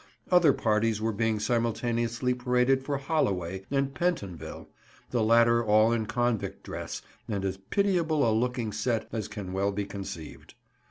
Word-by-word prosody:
Other 175 -5 +6
parties 110 -2 +1
were 110 +1 0
being 110 0 0
simultaneously 120 +2 0
paraded 125 +2 +2
for 140 +1 -1
Holloway 95 - -1
and 135 0 0
Pentonville, 130 - -3 0.4
the 120 - +1
latter 115 +1 +5
all 110 +1 +4
in 115 -2 0
convict 120 0 -1
dress - - -6 0.2
and 100 -3 -2
as 95 -1 -2
pitiable 160 - +1
a 110 - +3
looking 120 0 0
set 115 +1 -1
as 110 -3 -3
can 105 -3 -6
well 100 +1 +1
be 100 0 -2
conceived. 95 -6 -8
115 Hz, 150 wpm, -28 LUFS, 105-125 Hz, 0.4 s, Other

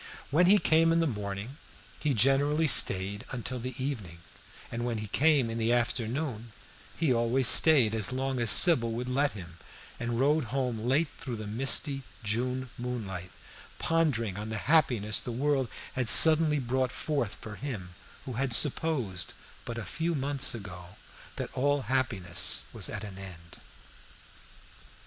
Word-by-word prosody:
When 175 +5 +3
he 205 +3 +6
came 165 -3 +2
in 165 - +1
the 165 - +1
morning 105 0 -6 0.4
he 145 -3 -2
generally 140 +6 +2
stayed 100 -6 +5
until 125 0 -6
the 125 +1 -7
evening, 115 -11 -6 0.5
and 115 0 -5
when 120 -2 -3
he 110 - -6
came 145 +2 +1
in 115 0 -5
the 115 +1 0
afternoon 120 0 -3 0.4
he 155 -6 0
always 120 +2 +2
stayed 135 -9 +5
as 110 0 0
long 130 0 -3
as 120 -2 0
Sybil 120 - +6
would 125 +2 -5
let 140 +3 -1
him, 85 -4 -12 0.4
and 120 0 -4
rode 145 +2 +1
home 125 -1 -4
late 135 +8 -1
through 130 -7 -6
the 110 -1 -8
misty 135 +5 0 0.2
June 125 +4 -3
moonlight 105 -8 -6 0.5
pondering 130 - -1
on 105 +1 -7
the 110 - -5
happiness 120 -9 +2
the 125 - -7
world 135 +1 -1 0.3
had 130 -3 0
suddenly 155 -1 +9
brought 130 -1 -2
forth 140 -9 -4
for 105 -2 -11
him 105 -9 -8 0.3
who 130 - -7
had 130 +1 -2
supposed, 130 - +1 0.3
but 120 - -7
a 115 - -6
few 165 +1 -3
months 140 -2 -3
ago, 90 -4 -11 0.4
that - - -7
all 145 +1 -1
happiness 110 -8 -1
was - - -3
at 105 - -6
an 100 -2 -9
end. 85 -3 -11
125 Hz, 155 wpm, -27 LUFS, 110-140 Hz, 0.5 s, suddenly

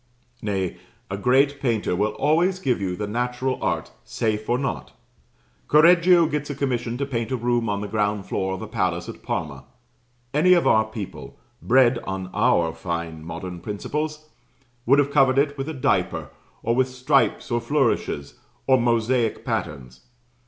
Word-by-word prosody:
Nay, 95 -4 -2 0.3
a - - -1
great 135 +6 +2
painter 115 -8 0
will 105 +3 0
always 170 +6 +2
give 130 - -1
you 90 -2 -2
the 105 - -3
natural 125 +4 -2
art, - - -2
safe 110 -1 -2
or 120 - +3
not. 135 +1 -4 0.7
Correggio 170 +2 +6
gets 150 -1 -3
a 145 - -3
commission 125 -3 -2
to 140 - -1
paint 115 -5 -3
a - - +1
room 120 -1 0
on 100 0 -1
the 105 - -4
ground 105 -1 -1
floor 95 0 -2
of 95 - -7
a - - -6
palace - - -1
at - - -9
Parma: 70 -4 -4 0.7
any 170 +5 +5
of 175 - +3
our 110 0 +4
people 110 -3 -8 0.2
bred 125 0 +4
on 95 -1 -5
our 80 -2 +2
fine 85 -3 -5
modern 85 +2 -6
principles 150 - -4 0.6
would 135 +3 +6
have 145 0 +2
covered 135 -2 +4
it 140 +1 +2
with 135 +2 -4
a - - -4
diaper, 130 - -1 0.3
or 115 - +1
with 130 0 +2
stripes 125 0 +1
or 120 0 +1
flourishes, 120 - -1 0.3
or 130 -2 +4
mosaic 115 0 +1
patterns. 65 -4 -4
120 Hz, 165 wpm, -23 LUFS, 100-140 Hz, 0.7 s, Correggio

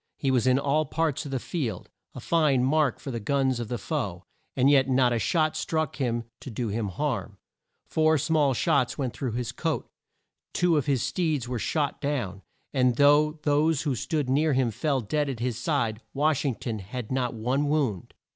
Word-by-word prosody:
He 135 - 0
was 130 -1 +2
in 130 0 +5
all 145 +3 +1
parts 155 -1 -1
of 140 - -6
the 135 - 0
field, 125 - -4 0.3
a - - -6
fine 150 -6 +2
mark 145 0 +2
for 135 - -6
the 115 - -3
guns 130 +2 +1
of 120 - -4
the 120 - -3
foe, 100 - -3 0.3
and 130 0 +3
yet 135 -2 +4
not 125 -2 +3
a 115 - 0
shot 155 +3 +1
struck 155 -3 -2
him 120 -4 -1 0.2
to - - -8
do 115 0 -3
him 105 +1 -2
harm. 105 -2 -3 0.5
Four 160 0 +2
small 145 -2 +2
shots 125 +1 +1
went 130 -5 -2
through 130 -5 -3
his 120 0 -3
coat. 160 +5 -2 0.7
Two 175 -2 +2
of 150 -2 0
his 135 -4 +1
steeds 150 -2 -1
were 125 -1 -3
shot 145 +5 -1
down; 120 -10 -2 0.3
and 125 -3 +3
though 145 +3 +5
those 150 +1 +2
who 145 -4 0
stood 150 +3 -2
near 145 +3 +2
him 130 -3 +2
fell 140 +2 0
dead 145 +6 -1
at 130 -4 -4
his 120 -1 -2
side, 120 -6 -1
Wash 145 0 +1
ing 135 -4 0
ton 110 -1 -4
had 110 +5 -7
not 125 -2 -1
one 130 +6 0
wound. 135 - -1
135 Hz, 200 wpm, -27 LUFS, 120-150 Hz, 0.7 s, in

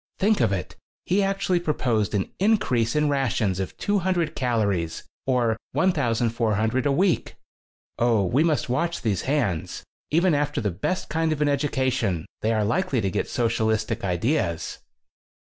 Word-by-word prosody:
Think 210 +2 +2
of - - +3
it! 95 -4 -3 0.3
He 190 +3 +2
actually 195 -2 +1
proposed 115 - 0
an 95 - -1
increase 185 - +2
in 150 0 +2
rations 125 -9 0
of 95 - -4
200 185 -5 0
calories, 100 - -1 0.2
or 120 -4 +2 0.2
1,400 115 - +1
a - - +2
week. 180 +5 +1 0.6
Oh, 115 -4 +3
we 130 - +2
must 160 -3 +1
watch 165 +8 -1
these 105 -6 0
hands. 115 - -1 0.3
Even 170 +3 +3
after 145 0 0
the 105 -3 -1
best 180 - -2
kind 160 +1 0
of 155 - -1
an 150 -1 +2
education 130 - 0 0.2
they 110 - +1
are 110 -2 +1
likely 150 - 0
to 100 -3 -1
get - - -2
socialistic 110 -2 0
ideas." 90 - -1
125 Hz, 145 wpm, -24 LUFS, 110-160 Hz, 0.6 s, of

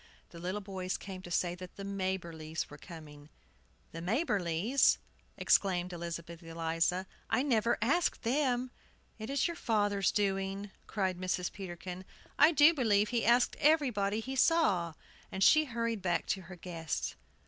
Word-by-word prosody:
The 170 - -10
little 185 +4 -3
boys 190 -2 -4
came 190 -2 -8
to 175 - -10
say 175 0 0
that 180 0 -10
the 200 - -7
Maberlys 175 -6 -3
were 145 - -9
coming. 150 -4 -12 0.6
"The 165 - -7
Maberlys!" 205 - +2 0.4
exclaimed 180 -2 +2
Elizabeth 170 0 -6
Eliza. 165 +2 -1 0.2
"I 255 - +2
never 235 -4 +2
asked 325 +7 +1
them." 255 0 +1 0.5
"It 220 - -6
is 280 +4 +1
your 340 - -3
father's 205 - +1
doing," 195 0 -1 0.2
cried 190 -4 -1
Mrs. 180 -1 -1
Peterkin. 180 -1 -7 0.4
"I 300 +3 +8
do 300 +1 +6
believe 215 -7 +2
he 235 -2 0
asked 240 +1 +4
everybody 240 -9 +2
he 265 +4 -5
saw!" 195 - +3 0.4
And 190 - 0
she 310 +8 +6
hurried 230 -4 -2
back 175 -2 0
to 190 +1 0
her 185 - -8
guests. 165 - -4
195 Hz, 150 wpm, -32 LUFS, 175-235 Hz, 0.6 s, I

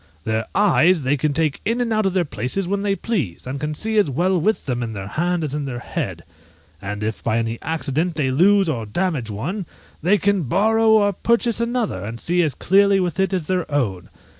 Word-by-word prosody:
Their 110 +2 -1
eyes 185 -5 +4
they 130 +3 +2
can 150 +1 0
take 155 -1 0
in 230 +3 0
and 235 -2 0
out 215 -2 +2
of 190 - -1
their 180 -2 +2
places 155 +6 -2
when 200 +2 -1
they 200 -1 0
please, 160 - -3
and 135 +2 -4
can 150 +1 -3
see 220 +6 0
as 200 - +2
well 175 +6 +1
with 215 +6 0
them 125 -3 -2
in 115 -2 -4
their 95 -2 -6
hand 175 +3 -1
as 145 -3 -3
in 150 -1 -2
their 130 -3 -4
head! 120 - -4 0.6
and 105 +1 -5
if 110 +1 -3
by 115 -1 +1
any 115 0 -2
accident 160 +2 -1
they 140 -4 0
lose 195 +7 +4
or 120 -8 -2
damage 150 - -1
one, 160 - -4 0.3
they 190 +6 +3
can 200 0 +1
borrow 220 - +2
or 205 -2 +4
purchase 235 +3 +1
another, 235 - -1
and 115 +3 -6
see 175 +6 +1
as 155 -5 0
clearly 200 +1 +4
with 180 0 -2
it 190 0 +2
as 185 -5 -1
their 180 -2 -2
own. 105 -12 -1
165 Hz, 220 wpm, -21 LUFS, 130-200 Hz, 0.6 s, eyes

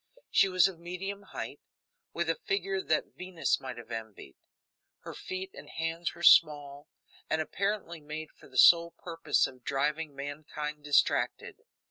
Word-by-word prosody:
She 195 - +5
was 185 0 +5
of 185 -4 -8
medium 185 +4 -5
height, - - -6 0.5
with - - -2
a - - +3
figure 390 +1 0
that - - -1
Venus 180 -2 -1
might 130 -2 -7
have 120 0 -11
envied. 110 -11 -7 0.7
Her - - -8
feet 190 +1 -6
and - - -11
hands 165 +1 -3
were 170 - -10
small, 145 -4 +5 0.4
and 160 - +1
apparently 185 0 -2
made 155 +1 -7
for - - -18
the 130 - -10
sole 170 +4 +7
purpose 165 -4 0
of 125 -1 -9
driving 145 +3 -1
mankind 150 +1 -6
distracted. 145 -1 +1
160 Hz, 150 wpm, -30 LUFS, 145-180 Hz, 0.7 s, sole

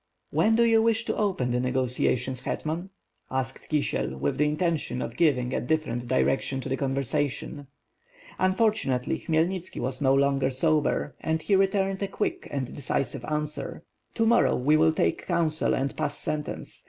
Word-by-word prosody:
"When 220 +1 +3
do 235 - +4
you 225 -1 +5
wish 225 0 +2
to - - -1
open 185 - 0
the 125 - +1
negotiations, 125 0 +1
Hetman?" 160 +7 -3 0.4
asked 130 0 -3
Kisiel, 145 - -1
with 70 - -1
the 150 - +4
intention 155 -3 -1
of - - -4
giving 130 -7 +2
a - - 0
different 125 -4 -1
direc 130 +1 +2
tion 135 - -2
to 135 - -6
the 130 - +1
conversation. 140 +1 -2 0.7
Unfortunately, 185 - +1
Khmyelnitski 170 +3 -1
was 130 +2 -3
no 135 -1 +4
longer 135 -1 +2
sober, 150 +1 +1
and 160 0 -1
he 200 - +3
returned 195 0 +1
a 200 - 0
quick 195 - -3
and 135 -3 -4
decisive 140 0 -2
answ^er. 150 0 -3 0.3
"To 225 - +2
morrow 235 +1 +4
we 145 +5 +3
will 160 +1 +5
take 160 - -1
counsel 160 -2 +1
and 135 +1 -2
pass 150 -1 -2
sentence. 150 -1 -4
150 Hz, 165 wpm, -27 LUFS, 130-170 Hz, 0.7 s, you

